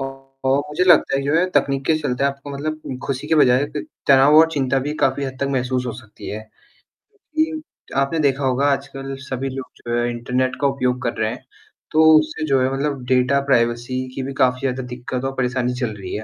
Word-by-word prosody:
और 135 Hz, 0 st, -3 dB
मुझे 155 Hz, +5 st, 0 dB
लगता 175 Hz, -6 st, +5 dB
है -, -, 0 dB
कि -, -, -5 dB
जो 150 Hz, -, +2 dB
है 175 Hz, -, +3 dB
तकनीक 135 Hz, -1 st, +1 dB
के 160 Hz, -, +3 dB
चलते 140 Hz, -3 st, -1 dB
आपको 140 Hz, +1 st, -3 dB
मतलब 145 Hz, -1 st, -5 dB
ख़ुशी 140 Hz, +1 st, -3 dB
के 160 Hz, -, +3 dB
बजाय 130 Hz, -2 st, +5 dB
त -, -, -2 dB, 0.3 s
तनाव 140 Hz, +2 st, +6 dB
और 160 Hz, +1 st, +7 dB
चिंता 135 Hz, -3 st, +1 dB
भी 150 Hz, -, -2 dB
काफ़ी 140 Hz, -, +2 dB
हद 130 Hz, -1 st, -5 dB
तक 140 Hz, -, +1 dB
महसूस 125 Hz, -1 st, -1 dB
हो 120 Hz, -, -3 dB
सकती 110 Hz, -3 st, -11 dB
है 105 Hz, -, -5 dB, 0.6 s
क्योंकि 315 Hz, -6 st, -5 dB
आपने 140 Hz, +4 st, 0 dB
देखा 140 Hz, -2 st, +1 dB
होगा 130 Hz, +2 st, +1 dB
आजकल 135 Hz, 0 st, -4 dB
सभी 130 Hz, +1 st, -2 dB
लोग 130 Hz, 0 st, -7 dB
जो 120 Hz, 0 st, -2 dB
है 120 Hz, 0 st, 0 dB
इंटरनेट 125 Hz, +2 st, -1 dB
का 140 Hz, -, +4 dB
उपयोग 125 Hz, -2 st, -1 dB
कर 120 Hz, -, -1 dB
रहे 110 Hz, -1 st, 0 dB
हैं, 125 Hz, -, -9 dB, 0.5 s
तो 155 Hz, +1 st, +4 dB, 0.2 s
उससे 155 Hz, +1 st, -3 dB
जो 135 Hz, -2 st, +3 dB
है 130 Hz, +1 st, +1 dB
मतलब 140 Hz, -1 st, -2 dB
डाटा 130 Hz, +2 st, +3 dB
प्राइवेसी 120 Hz, 0 st, 0 dB
की 135 Hz, -, -3 dB
भी 135 Hz, +1 st, -5 dB
काफ़ी 130 Hz, -1 st, +2 dB
ज़्यादा 130 Hz, -1 st, -2 dB
दिक्कत 125 Hz, +1 st, -5 dB
और 135 Hz, -, -2 dB
परेशानी 125 Hz, -1 st, 0 dB
चल 115 Hz, -4 st, -2 dB
रही 95 Hz, -2 st, -7 dB
है 110 Hz, -, -4 dB
135 Hz, 220 wpm, -21 LUFS, 125-140 Hz, 0.6 s, और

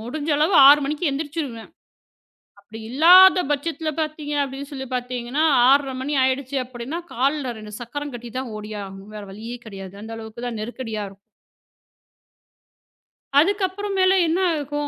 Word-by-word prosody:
முடிஞ்ச 290 Hz, +7 st, -4 dB
அளவு 320 Hz, +5 st, +2 dB
6:00 295 Hz, +1 st, +7 dB
மணிக்கு 300 Hz, +4 st, -1 dB
எந்திரிச்சுருவேன். 280 Hz, -5 st, -5 dB, 0.9 s
அப்பிடி 215 Hz, +3 st, -12 dB
இல்லாத 360 Hz, +8 st, +7 dB
பட்சத்தில 315 Hz, +2 st, -2 dB
பாத்தீங்க 305 Hz, -1 st, -4 dB
அப்பிடின்னு 275 Hz, +1 st, -5 dB
சொல்லிப் 265 Hz, -1 st, -6 dB
பாத்தீங்கன்னா 250 Hz, +3 st, -2 dB, 0.3 s
6:30 275 Hz, -1 st, +3 dB
மணி 285 Hz, +3 st, -3 dB
ஆயிடுச்சு 265 Hz, +1 st, -1 dB
அப்பிடின்னா 255 Hz, +6 st, -6 dB
கால்ல 270 Hz, 0 st, 0 dB
ரெண்டு 215 Hz, -1 st, -10 dB
சக்கரம் 290 Hz, +4 st, -6 dB
கட்டிதான் 240 Hz, +1 st, -6 dB
ஓடியாகணும். 205 Hz, -1 st, -8 dB
வேற 210 Hz, -, -7 dB
வழியே 225 Hz, +4 st, -7 dB
கெடையாது. 195 Hz, -3 st, -9 dB
அந்த 225 Hz, +1 st, -8 dB
அளவுக்குத் 225 Hz, +2 st, -7 dB
தான் 230 Hz, -3 st, -5 dB
நெருக்கடியா 225 Hz, -2 st, -5 dB
இருக்கும். 195 Hz, 0 st, -18 dB, 2.2 s
அதுக்கப்புறம் 395 Hz, +3 st, 0 dB
மேல 370 Hz, 0 st, +5 dB
என்ன 330 Hz, +3 st, 0 dB, 0.2 s
ஆகும் 290 Hz, 0 st, -3 dB
265 Hz, 135 wpm, -22 LUFS, 230-300 Hz, 2.2 s, 6:00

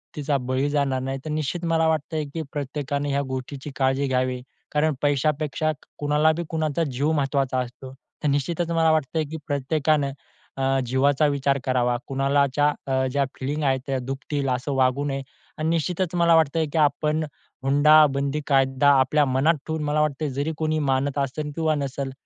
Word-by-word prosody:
तिचा 145 Hz, -1 st, 0 dB
बळी 130 Hz, +2 st, -1 dB
जाणार 140 Hz, -3 st, 0 dB
नाही. 135 Hz, +1 st, -3 dB
तर 155 Hz, -, -4 dB
निश्चित 155 Hz, +3 st, -2 dB
मला 160 Hz, -1 st, +2 dB
वाटतंय 155 Hz, 0 st, -1 dB
की 165 Hz, -, -3 dB
प्रत्येकाने 145 Hz, 0 st, -3 dB
ह्या 140 Hz, 0 st, +1 dB
गोष्टीची 135 Hz, +2 st, -5 dB
काळजी 135 Hz, +1 st, +1 dB
घ्यावी 130 Hz, -1 st, 0 dB, 0.3 s
कारण 150 Hz, +1 st, +2 dB
पैशापेक्षा, 150 Hz, +2 st, +1 dB, 0.3 s
कुणाला 150 Hz, +2 st, +3 dB
बी 170 Hz, -, -2 dB
कुणाचा 160 Hz, 0 st, 0 dB
जीव 145 Hz, +5 st, 0 dB
महत्त्वाचा 135 Hz, -3 st, 0 dB
असतो. 130 Hz, +1 st, -6 dB, 0.3 s
तर -, -, +1 dB
निश्चितच 160 Hz, +5 st, -1 dB
मला 165 Hz, -1 st, +3 dB
वाटतंय, 155 Hz, +1 st, 0 dB
की 160 Hz, +2 st, -6 dB
प्रत्येकानं 145 Hz, 0 st, +1 dB, 0.5 s
अ, 135 Hz, 0 st, +1 dB
जीवाचा 140 Hz, +4 st, +3 dB
विचार 140 Hz, -1 st, +1 dB
करावा 125 Hz, -2 st, +1 dB
कुणालाच्या 140 Hz, +1 st, +2 dB, 0.2 s
अ, 130 Hz, 0 st, +1 dB
ज्या 140 Hz, 0 st, +1 dB
फीलिंग 145 Hz, +3 st, -2 dB
आहे 135 Hz, -2 st, +2 dB
त्या 135 Hz, -1 st, -1 dB
दुखतील 135 Hz, +2 st, -3 dB
असं 130 Hz, +3 st, -1 dB
वागू 130 Hz, +2 st, +2 dB
नये 135 Hz, -1 st, -2 dB, 0.4 s
आणि 155 Hz, +1 st, -1 dB
निश्चितच 175 Hz, +2 st, -1 dB
मला 170 Hz, -1 st, +4 dB
वाटतंय, 160 Hz, 0 st, +2 dB
की -, -, 0 dB
आपण 150 Hz, +2 st, +2 dB, 0.4 s
हुंडाबंदी 145 Hz, 0 st, +4 dB
कायदा 135 Hz, 0 st, +3 dB
आपल्या 145 Hz, +3 st, +3 dB
मनात 135 Hz, +5 st, +3 dB
ठेवून 160 Hz, -1 st, -2 dB
मला 150 Hz, +1 st, +1 dB
वाटतं 150 Hz, 0 st, -1 dB
जरी 155 Hz, +3 st, -1 dB
कोणी 155 Hz, 0 st, 0 dB
मानत 140 Hz, +2 st, 0 dB
असेल 150 Hz, +2 st, -2 dB
किंवा 160 Hz, -1 st, +1 dB
नसेल 140 Hz, -1 st, -3 dB
145 Hz, 165 wpm, -24 LUFS, 135-155 Hz, 0.5 s, मला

